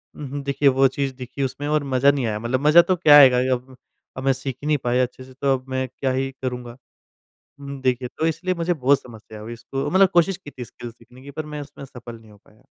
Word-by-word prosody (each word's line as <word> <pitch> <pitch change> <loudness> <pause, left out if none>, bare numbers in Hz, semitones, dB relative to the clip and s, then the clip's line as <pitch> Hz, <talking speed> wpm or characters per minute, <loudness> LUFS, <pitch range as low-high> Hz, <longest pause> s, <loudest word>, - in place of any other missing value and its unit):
उहुँ, 145 -1 -6
देखिए 140 0 +2
वो 135 +1 +4
चीज़ 135 0 -3
दिखी 130 +2 -6
उसमें 135 +2 -4
और 150 0 +1
मज़ा 135 0 +3
नहीं 140 -3 -2
आया। 105 -2 -2
मतलब 120 +3 -2
मज़ा 160 +3 +8
तो 185 +2 0
क्या 155 -4 +7
आएगा 130 -3 +8 0.2
अब 130 +1 -6 0.4
अब 130 - -5
मैं 135 - +4
सीख 135 0 -5
ही - - -3
नहीं 150 -1 +2
पाया 125 +1 +2
अच्छे 125 +1 -6
से 130 0 -15
तो 135 +1 0
अब 130 - -17
मैं 130 0 -2
क्या 130 +1 -3
ही 135 +1 -2
करूँगा? 125 -2 -5 0.8
उम, 140 -1 -8
देखिए 125 -1 0
तो 160 - 0
इसलिए 180 +3 -1
मुझे 170 +1 0
बहुत 140 -2 +2
समस्या 110 -2 -13
हुई 115 +2 -7
इसको 135 +3 -5
मतलब 190 0 +5
कोशिश 175 +2 +3
की 150 -6 -12
थी 125 -3 -8
स्किल्स 120 0 -10
सीखने 125 +2 -19
की 140 +1 -11
पर 155 +2 -6
मैं 150 -1 -6
उसमें 145 -1 -11
सफल 120 -3 -11
नहीं 110 -1 -18
हो 105 - -17
पाया। 105 - -25
135 Hz, 250 wpm, -22 LUFS, 125-145 Hz, 0.8 s, मज़ा